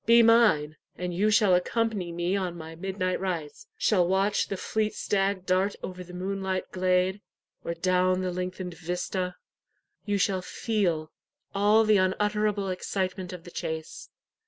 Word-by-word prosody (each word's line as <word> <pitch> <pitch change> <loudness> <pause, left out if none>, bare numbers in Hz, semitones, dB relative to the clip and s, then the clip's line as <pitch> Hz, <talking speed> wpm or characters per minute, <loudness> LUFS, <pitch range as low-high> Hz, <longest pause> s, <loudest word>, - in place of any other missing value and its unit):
Be 235 0 +7
mine, 215 -10 +4 0.2
and 180 0 -3
you 200 +5 +2
shall 210 -3 +4
accompany 200 0 0
me 175 +3 -1
on 180 -3 -2
my 160 0 -8
midnight 185 +1 -2
rides; 170 -6 -4
shall 180 -5 +3
watch 195 +3 +2
the 195 - -3
fleet 215 +2 -1
stag 195 -2 0
dart 185 +2 +1
over 185 0 -6
the 180 - -13
moonlight 190 0 -3
glade, 185 +1 +1 0.4
or 170 - -3
down 185 +1 +2
the 185 -1 -1
lengthened 180 0 -4
vista. 180 +2 -3 0.7
You 205 -1 0
shall 190 -1 +1
feel 180 -7 -1 0.4
all 210 +3 +4
the 215 -1 +4
unutterable 205 +1 +1
excitement 185 0 -3
of 180 -2 -8
the 175 - -11
chase. 160 -1 -5
185 Hz, 150 wpm, -27 LUFS, 180-200 Hz, 0.7 s, Be